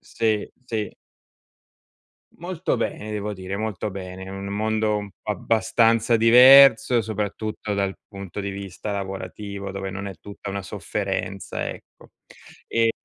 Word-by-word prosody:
Sì, 110 Hz, -2 st, -1 dB, 0.2 s
sì. 110 Hz, -4 st, -3 dB, 1.4 s
Molto 175 Hz, 0 st, -2 dB
bene 110 Hz, +1 st, -3 dB
devo 105 Hz, 0 st, -3 dB
dire, 95 Hz, +1 st, -5 dB
molto 110 Hz, -1 st, -3 dB
bene. 95 Hz, 0 st, -7 dB
Un 95 Hz, 0 st, -6 dB
mondo 110 Hz, +1 st, 0 dB
un 105 Hz, -1 st, -5 dB
abbastanza 115 Hz, +3 st, +2 dB
diverso, 125 Hz, +1 st, +8 dB
soprattutto 105 Hz, 0 st, -3 dB
dal 100 Hz, -1 st, 0 dB
punto 100 Hz, -1 st, -7 dB
di 100 Hz, 0 st, -3 dB
vista 100 Hz, +1 st, -6 dB
lavorativo, 100 Hz, +1 st, -5 dB
dove 95 Hz, 0 st, -4 dB
non 100 Hz, +1 st, -5 dB
è 95 Hz, -, -6 dB
tutta 100 Hz, +1 st, -9 dB
una 100 Hz, 0 st, -3 dB
sofferenza, 95 Hz, 0 st, -3 dB
ecco. -, -, -12 dB, 0.6 s
Ehm 115 Hz, 0 st, +3 dB
105 Hz, 125 wpm, -24 LUFS, 100-110 Hz, 1.4 s, diverso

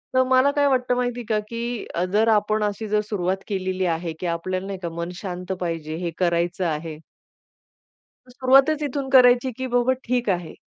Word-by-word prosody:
तर 260 Hz, -, +5 dB
मला 260 Hz, +2 st, +4 dB
काय 285 Hz, -1 st, +3 dB
वाटतं 250 Hz, -2 st, +1 dB
माहितीये 245 Hz, -1 st, -2 dB
का 215 Hz, -1 st, +2 dB
की 235 Hz, 0 st, -4 dB
अ, 175 Hz, -, 0 dB
जर 220 Hz, +2 st, +3 dB
आपण 215 Hz, 0 st, +1 dB
अशी 210 Hz, +1 st, -2 dB
जर 210 Hz, 0 st, +1 dB
सुरुवात 190 Hz, -2 st, -1 dB
केलेली 185 Hz, -2 st, -2 dB
आहे 165 Hz, -1 st, -2 dB
की -, -, -5 dB
आपल्याला, 185 Hz, +3 st, -2 dB
नाही 195 Hz, -1 st, -5 dB
का, 170 Hz, -, -2 dB
मन 170 Hz, +1 st, -5 dB
शांत 180 Hz, 0 st, -6 dB
पाहिजे 165 Hz, -3 st, -3 dB
हे 170 Hz, -, -2 dB
करायचं 175 Hz, 0 st, 0 dB
आहे 155 Hz, -1 st, -3 dB, 1.3 s
तर 250 Hz, -, -16 dB
सुरुवातच 270 Hz, +4 st, +4 dB
इथून 275 Hz, -1 st, -3 dB
करायची 250 Hz, 0 st, +6 dB
की 260 Hz, -, -3 dB
बाबा 245 Hz, +1 st, +2 dB
ठीक 245 Hz, -2 st, -1 dB
आहे. 175 Hz, -3 st, -2 dB
210 Hz, 185 wpm, -23 LUFS, 175-250 Hz, 1.3 s, करायची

